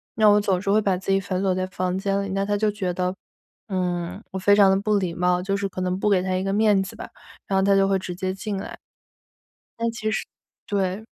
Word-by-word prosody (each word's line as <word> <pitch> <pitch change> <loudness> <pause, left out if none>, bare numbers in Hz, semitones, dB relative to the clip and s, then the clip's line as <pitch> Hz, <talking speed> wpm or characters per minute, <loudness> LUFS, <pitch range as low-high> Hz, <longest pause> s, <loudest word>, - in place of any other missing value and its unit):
那 215 -1 +4
我 210 0 +6
总 190 -3 +1
是 195 +1 -1
会 215 +1 +4
把 195 -3 +1
自 190 +1 -3
己 195 - +4
反 185 -1 -3
锁 190 -1 +2
在 185 0 -2
房 185 -1 -2
间 200 0 0
里， 200 - -5
那 195 +1 -1
她 205 0 0
就 210 0 +1
觉 195 -3 -2
得， 180 0 -1 0.6
嗯， 180 -1 -2
我 190 - -4
非 205 +2 +5
常 195 -2 +6
地 195 - +2
不 210 0 +2
礼 185 -4 -1
貌， 180 +1 +1
就 195 +2 -1
是 200 0 -1
可 185 - -6
能 185 +1 -1
不 210 - +1
给 190 -2 +3
她 185 0 -1
一 185 - -1
个 195 - -1
面 210 -2 +4
子 - - -9
吧， - - -8 0.4
然 195 - +1
后 - - +2
她 200 0 +4
就 195 0 +4
会 195 -1 +2
直 180 -1 -6
接 185 0 -2
进 200 +1 -4
来。 190 - -7 1.0
但 230 0 0
其 220 -2 -3
实 - - -2 0.4
对。 195 +1 -1
195 Hz, 280 characters per minute, -24 LUFS, 185-205 Hz, 1.0 s, 我